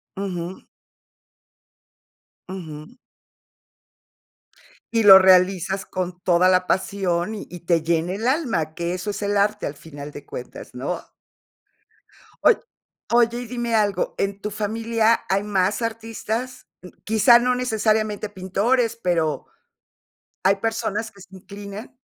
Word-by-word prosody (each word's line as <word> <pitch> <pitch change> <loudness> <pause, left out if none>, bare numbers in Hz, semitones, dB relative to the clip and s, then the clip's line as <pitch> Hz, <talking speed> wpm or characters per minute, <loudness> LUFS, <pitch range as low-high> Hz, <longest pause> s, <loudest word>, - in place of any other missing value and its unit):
Ujú. 185 -2 -5 1.8
Ujú. 160 +2 -8 2.0
Y 225 -1 +3
lo 195 -2 +11
realizas 190 0 +3
con 180 -1 -4
toda 180 0 +3
la 185 0 +2
pasión, 190 +1 -1
y - - -8
y 175 -1 -9
te 170 -2 +1
llena 170 +2 0
el 220 +4 -2
alma, 240 - 0
que 170 0 -2
eso 185 +3 -4
es 200 0 -4
el 205 0 0
arte, 210 +1 +1
al 145 - -6
final 145 -1 -10
de 145 - -10
cuentas, 125 - -9
¿no? 140 +8 -4 1.4
Oy 475 - +6 0.6
oye, 235 0 +3
y - - -6
dime 235 -1 -2
algo, 205 -2 0
¿en 200 0 -2
tu 210 - -4
familia 225 +2 +1
hay 195 +1 +1
más 195 +1 0
artistas? 230 +2 -4 0.4
Quizá, 225 +2 +6
no 250 +1 +1
necesariamente 215 -3 0
pintores 215 +5 0
pero, 160 -6 0 1.0
¿hay 195 +1 +4
personas 220 0 -2
que 200 - -17
se 185 +1 -14
inclinan? 200 +5 -10
200 Hz, 125 wpm, -23 LUFS, 180-225 Hz, 2.0 s, lo